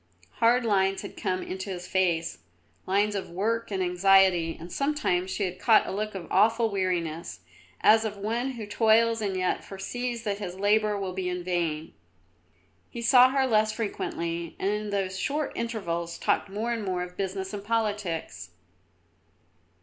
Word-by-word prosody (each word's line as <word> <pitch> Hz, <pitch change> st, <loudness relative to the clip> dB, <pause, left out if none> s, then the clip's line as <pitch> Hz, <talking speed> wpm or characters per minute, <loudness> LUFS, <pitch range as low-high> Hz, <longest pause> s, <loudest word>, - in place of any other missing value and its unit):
Hard 235 Hz, +1 st, +4 dB
lines 195 Hz, -2 st, +1 dB
had -, -, -8 dB
come 185 Hz, -2 st, -2 dB
into 190 Hz, +2 st, -5 dB
his 180 Hz, -2 st, -5 dB
face, 175 Hz, -, 0 dB, 0.5 s
lines 205 Hz, +2 st, +2 dB
of 200 Hz, -2 st, -4 dB
work 220 Hz, +6 st, -1 dB
and 190 Hz, -2 st, -1 dB
anxiety, 180 Hz, -2 st, +4 dB
and 170 Hz, +2 st, -9 dB
sometimes 275 Hz, -11 st, 0 dB
she 205 Hz, -, -2 dB
had 180 Hz, -1 st, -3 dB
caught 215 Hz, +2 st, +5 dB
a -, -, -4 dB
look 215 Hz, +1 st, -3 dB
of 180 Hz, -3 st, -5 dB
awful 225 Hz, +3 st, +3 dB
weariness, 170 Hz, -, -2 dB, 0.4 s
as 220 Hz, +1 st, +6 dB
of 210 Hz, -2 st, -4 dB
one 235 Hz, +6 st, -2 dB
who 230 Hz, -3 st, -6 dB
toils 225 Hz, +2 st, +3 dB
and 195 Hz, -3 st, -1 dB
yet 185 Hz, 0 st, 0 dB
foresees 235 Hz, +5 st, -4 dB
that 205 Hz, -2 st, -2 dB
his 185 Hz, -3 st, -5 dB
labour 210 Hz, +1 st, +2 dB
will 190 Hz, -2 st, -3 dB
be 180 Hz, -1 st, -2 dB
vain. 170 Hz, -3 st, -2 dB, 1.0 s
He 235 Hz, -2 st, -6 dB
saw 250 Hz, +1 st, +7 dB
her 270 Hz, 0 st, +2 dB
less 215 Hz, -3 st, +3 dB
frequently, 170 Hz, -6 st, -3 dB
and 195 Hz, -, 0 dB
in 210 Hz, 0 st, -3 dB
those 190 Hz, -2 st, -2 dB
short 295 Hz, +5 st, -1 dB
intervals 170 Hz, -8 st, -3 dB
talked -, -, 0 dB
more 220 Hz, +4 st, -2 dB
and 225 Hz, -2 st, -3 dB
more 185 Hz, -2 st, -1 dB
of 180 Hz, 0 st, -9 dB
business 190 Hz, 0 st, -3 dB
and 200 Hz, -1 st, -5 dB
politics. 205 Hz, -, -2 dB
200 Hz, 165 wpm, -27 LUFS, 180-220 Hz, 1.0 s, saw